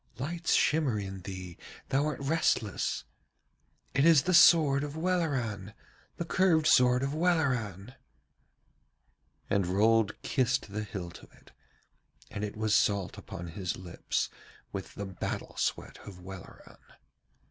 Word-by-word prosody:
Lights 165 +6 -1
shimmer 150 -8 +2
in 95 -1 -5
thee, 90 -1 -8 0.3
thou 140 +3 +1
art 150 - -3
restless. 140 -8 0 0.9
It 140 - +2
is 160 -4 +6
the 185 - 0
sword 150 -5 +6
of 145 +1 -5
Welleran, 130 - -1 0.4
the 170 - -3
curved 170 -3 +2
sword 125 -2 +5
of 140 +1 -1
Welleran!' 130 - 0 1.5
And 100 -3 +1
Rold 105 +3 +2
kissed 130 -5 0
the 105 - -2
hilt 90 -5 -7
of - - -17
it, - - -21 0.8
and 105 - -5
it 105 0 -5
was 110 -1 0
salt 100 -3 +2
upon 85 0 -8
his 90 +1 -4
lips 90 -2 -3 0.4
with 95 -4 -7
the 100 - -5
battle 95 -3 -5
sweat - - -3
of 95 -3 -10
Welleran. 95 0 -12
115 Hz, 130 wpm, -30 LUFS, 95-150 Hz, 1.5 s, is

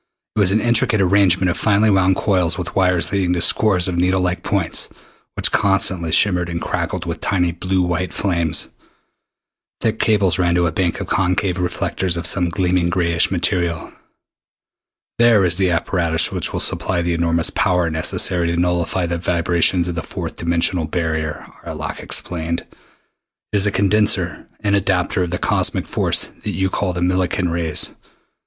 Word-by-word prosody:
It - - -1
was 100 -3 +4
an 105 +3 +2
intricate 120 -2 +2
arrangement 95 -1 +3
of - - -5
finely 105 0 +3
wound 95 -1 +3
coils 90 -4 0
with 90 -2 -5
wires 90 -5 +1
leading 95 -2 +1
to 90 - -1
scores 95 -1 +3
of 90 -2 -2
needle 90 +2 +2
like 90 0 -1
points 100 -6 -1 0.5
which - - +1
constantly 95 -4 +1
shimmered 90 -1 +2
and 85 0 -3
crackled - - -3
with - - -5
tiny 90 -3 +1
blue 90 +2 -1
white 90 +1 -2
flames. 85 -6 -1 1.1
Thick 110 -1 -1
cables 100 -5 +2
ran 85 -1 +2
to 85 0 +2
a 80 - 0
bank 85 0 -1
of - - -3
concave 90 -1 0
reflectors 90 0 -1
of 85 - -4
some 90 -2 +1
gleaming 90 0 0
grayish 85 -2 +1
metal. 85 -2 -1 1.3
"There 115 -5 +5
is 85 -1 +2
the 95 -2 +2
apparatus 85 -1 +1
which - - -1
will - - -3
supply 90 -2 -1
the 85 0 0
enormous 85 0 +1
power 90 -3 +1
necessary 85 +2 0
to 85 0 -1
nullify 90 +1 0
the 85 0 -3
vibrations 85 0 +1
of 90 - -3
the 85 - -3
fourth - - -6
dimensional 85 +1 0
barrier," 80 -2 -3 0.2
Arlok - - -6
explained. 85 -1 -3 0.9
"It - - +3
is 100 +1 +3
a - - +1
condenser 100 -4 +1
and 100 -2 +1
adapter 90 -2 0
of 90 - -1
the 90 - -2
cosmic - - 0
force - - 0
that - - -4
you 95 0 0
call 95 -3 -1
the 90 - -4
Millikan 90 -1 0
rays. 85 -2 0
90 Hz, 170 wpm, -19 LUFS, 85-95 Hz, 1.3 s, There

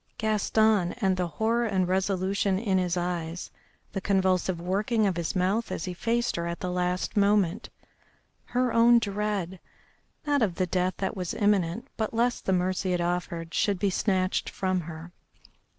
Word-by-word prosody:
Gaston, 215 -3 +2
and 195 -6 +1
the 180 -1 -1
horror 225 +8 0
and 190 -3 +1
resolution 190 +1 0
in 195 -3 +1
his 180 -1 0
eyes, 175 -1 -3 0.4
the 195 - -3
convulsive 185 -2 +1
working 210 +5 0
of 190 -3 +1
his 170 +1 -3
mouth 190 +5 0
as - - -3
he 180 - -4
faced 235 +5 -1
her 170 0 -2
at 170 0 -4
the 180 - -3
last 180 0 -1
moment. 200 -2 +2 0.8
Her 250 -1 0
own 235 +1 +6
dread 200 -4 -2 0.7
not 290 -2 +2
of 195 -6 +1
the 185 - +1
death 180 +1 0
that 195 - -2
was 180 -3 -4
imminent, 205 -1 +1
but 220 0 -2
lest 240 +1 0
the - - +3
mercy 185 +1 0
it 175 - 0
offered 170 -1 -2
should 205 -2 +1
be 195 +1 0
snatched 185 -1 0
from 185 -1 -1
her. 165 +1 -9
190 Hz, 165 wpm, -27 LUFS, 180-210 Hz, 0.8 s, own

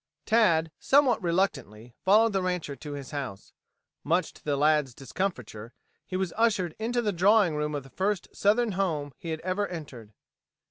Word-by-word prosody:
Tad, 170 -8 +3
somewhat 270 -4 +3
reluctantly, 135 - -2
followed 215 +3 +4
the 195 - +1
rancher 180 -6 -2
to 145 +1 -8
his 140 -2 -7
house. 135 -9 -6 0.5
Much 170 +5 0
to - - -19
the 145 -2 -1
lad's 150 -3 +2
discomfiture, 125 - -5 0.3
he 185 - -3
was 190 -2 -2
ushered 205 -7 +1
into 240 +2 -1
the 210 -2 0
drawing 190 -1 +4
room 150 0 -2
of 145 - -4
the 135 - -15
first 195 0 -1
southern 220 +3 +2
home 160 -7 -2
he 165 - -7
had 160 0 -3
ever 185 +3 -1
entered. 135 -11 -9
170 Hz, 170 wpm, -27 LUFS, 145-200 Hz, 0.5 s, followed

